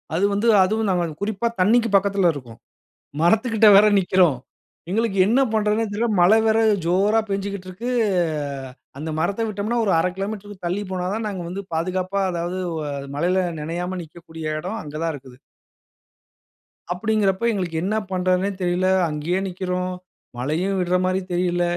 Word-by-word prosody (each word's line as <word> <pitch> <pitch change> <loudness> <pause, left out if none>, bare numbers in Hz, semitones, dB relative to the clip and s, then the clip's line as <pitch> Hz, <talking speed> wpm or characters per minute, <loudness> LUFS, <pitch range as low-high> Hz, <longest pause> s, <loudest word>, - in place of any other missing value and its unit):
அது 190 - +2
வந்து 205 +4 0 0.2
அதுவும் 215 +3 0
நாங்க 175 -2 +1 0.2
குறிப்பா 215 +2 -1
தண்ணீக்கு 230 +4 +3
பக்கத்தில 195 -2 +3
இருக்கோம். 120 -5 -10 0.6
மரத்து 220 +8 +3
கிட்டே 215 0 +6
வேற 210 +1 +7
நிக்கிறோம். 180 -6 +3 0.5
எங்களுக்கு 215 0 0
என்ன 245 +5 +3
பண்ணறதுன்னே 215 +1 +1
தெரியல. 225 +3 0
மழை 205 +6 +6
வேற 220 0 +3 0.3
ஜோரா 195 +6 +3
பெஞ்சுகிட்டு 195 -1 -3
இருக்கு. 225 +7 -5 1.1
அந்த 155 +3 -5
மரத்தை 200 +7 0
விட்டோம்ன்னா 215 +3 -2
ஒரு 200 - +2
1/2 180 - +1
கிலோமீட்டர்க்கு 205 -1 -6
தள்ளி 185 +4 -1
போனா 180 -1 -2
தான் 225 - -3
நாங்க 195 -3 -4
வந்து 195 +2 -5
பாதுகாப்பா, 185 +3 -1
அதாவது 175 +2 -3 0.2
உ - - -3 0.4
மழையில் 180 +4 +2 0.2
நினையாம 175 +4 -4
நிக்கக்கூடிய 160 -1 -7
இடம் 215 +5 -4
அங்க 150 0 -9
தான் 165 -1 -1
இருக்குது. 130 -2 -13 1.6
அப்படீன்குறப்ப 210 +1 0
எங்களுக்கு 180 -5 -3
என்ன 210 +3 0 0.2
பண்ணுறதுன்னே 185 +1 +1
தெரியல. 180 +1 +1 0.2
அங்கேயே 155 +5 -1
நிக்கிறோம். 180 0 -3 0.4
மழையும் 165 +10 -1
விடுற 180 0 +1
மாதிரி 185 +1 0
தெரியல, 175 0 +1
185 Hz, 145 wpm, -22 LUFS, 175-205 Hz, 1.6 s, வேற